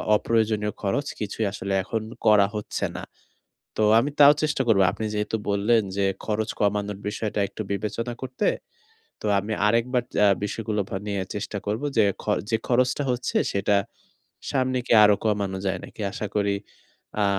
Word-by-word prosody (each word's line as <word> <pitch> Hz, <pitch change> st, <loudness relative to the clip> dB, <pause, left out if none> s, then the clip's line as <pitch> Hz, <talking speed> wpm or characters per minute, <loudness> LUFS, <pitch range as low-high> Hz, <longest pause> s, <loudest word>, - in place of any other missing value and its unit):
অপ্রয়োজনীয় 110 Hz, -1 st, +1 dB
খরচ 125 Hz, +8 st, -1 dB
কিছুই 105 Hz, +1 st, -2 dB
আসলে 100 Hz, -1 st, -3 dB
এখন 110 Hz, +3 st, -2 dB, 0.2 s
করা 105 Hz, -2 st, +6 dB
হচ্ছে 105 Hz, -, -3 dB
না। -, -, -6 dB, 0.7 s
তো 110 Hz, -, +2 dB, 0.2 s
আমি 140 Hz, +4 st, -1 dB
তাও 145 Hz, 0 st, +9 dB
চেষ্টা 150 Hz, -3 st, +1 dB
করব। 110 Hz, -4 st, +4 dB
আপনি 110 Hz, -, -5 dB
যেহেতু 105 Hz, +1 st, -1 dB
বললেন 105 Hz, +3 st, +3 dB
যে, 100 Hz, -, +2 dB, 0.2 s
খরচ 110 Hz, 0 st, -1 dB
কমানোর 105 Hz, -1 st, 0 dB
বিষয়টা 105 Hz, 0 st, -2 dB
একটু -, -, -7 dB
বিবেচনা 110 Hz, +4 st, -3 dB
করতে। 130 Hz, +8 st, -2 dB, 0.7 s
তো -, -, -6 dB
আমি 105 Hz, +2 st, -4 dB
আরেকবার 120 Hz, +3 st, +1 dB, 0.2 s
আ -, -, +6 dB, 0.2 s
বিষয়গুলো 105 Hz, 0 st, -2 dB, 0.3 s
নিয়ে 100 Hz, -2 st, -1 dB
চেষ্টা 105 Hz, 0 st, -4 dB
করব 105 Hz, +3 st, -1 dB, 0.2 s
যে, 110 Hz, -, +6 dB, 0.5 s
যে 115 Hz, -, +2 dB
খরচটা 130 Hz, +3 st, +2 dB
হচ্ছে, 125 Hz, 0 st, -1 dB
সেটা 100 Hz, +1 st, +2 dB, 0.7 s
সামনে 130 Hz, -2 st, +1 dB
কি -, -, 0 dB
আরো 105 Hz, 0 st, +6 dB
কমানো 100 Hz, -3 st, 0 dB
যায় 95 Hz, -, 0 dB
নাকি? -, -, -11 dB
আশা 105 Hz, -, -4 dB
করি 100 Hz, -1 st, +2 dB, 0.7 s
আ -, -, +3 dB
110 Hz, 155 wpm, -25 LUFS, 100-115 Hz, 0.7 s, তাও